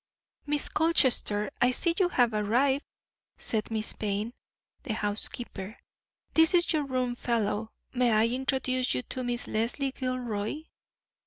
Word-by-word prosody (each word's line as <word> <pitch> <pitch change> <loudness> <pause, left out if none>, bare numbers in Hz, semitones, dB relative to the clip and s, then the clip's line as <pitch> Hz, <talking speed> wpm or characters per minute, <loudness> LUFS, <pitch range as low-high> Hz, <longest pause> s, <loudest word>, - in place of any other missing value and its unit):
"Miss 295 0 0
Colchester, 260 -10 +3
I 245 - +5
see 335 +7 +1
you 365 -2 +3
have 245 -8 +2
arrived," 250 +7 +1 0.5
said 215 -2 -1
Miss 220 -1 0
Payne 210 +2 -3 0.5
the 225 -6 -3
housekeeper. 210 0 -2 0.6
"This 320 +2 +5
is 345 -1 +3
your 300 -2 +1
room 255 -2 -1
fellow; 220 -3 -1 0.2
may 250 -2 +2
I 215 0 +4
introduce 255 - 0
you 125 - -2
to 255 - -5
Miss 245 0 -1
Leslie 240 +5 -1
Gilroy?" 255 0 -3
245 Hz, 135 wpm, -28 LUFS, 215-265 Hz, 0.6 s, I